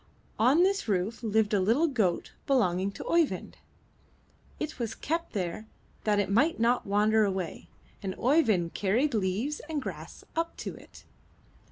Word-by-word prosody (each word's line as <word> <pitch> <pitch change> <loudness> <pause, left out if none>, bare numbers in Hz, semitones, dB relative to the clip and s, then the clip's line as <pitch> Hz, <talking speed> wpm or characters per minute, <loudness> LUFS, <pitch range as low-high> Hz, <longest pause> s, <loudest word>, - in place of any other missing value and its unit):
On 265 +10 +5
this 390 -3 +1
roof 205 +3 -1
lived 220 -2 +1
a 205 - +4
little 230 - +3
goat 220 - 0 0.2
belonging 195 - +2
to - - -7
Oeyvind; 335 -3 0 1.0
it 310 -3 -4
was 225 -2 -3
kept 330 +3 -3
there 190 +2 -3 0.4
that 210 -1 +3
it 205 - +1
might 285 +10 +3
not 235 0 +2
wander 210 +2 +3
away, 190 -4 -3 0.3
and 190 -2 -4
Oeyvind 225 - +2
carried 235 +9 +1
leaves 215 +8 -1
and 310 -2 -1
grass 270 - -7
up 330 +1 -2
to - - -5
it. - - -15
220 Hz, 150 wpm, -29 LUFS, 200-285 Hz, 1.0 s, On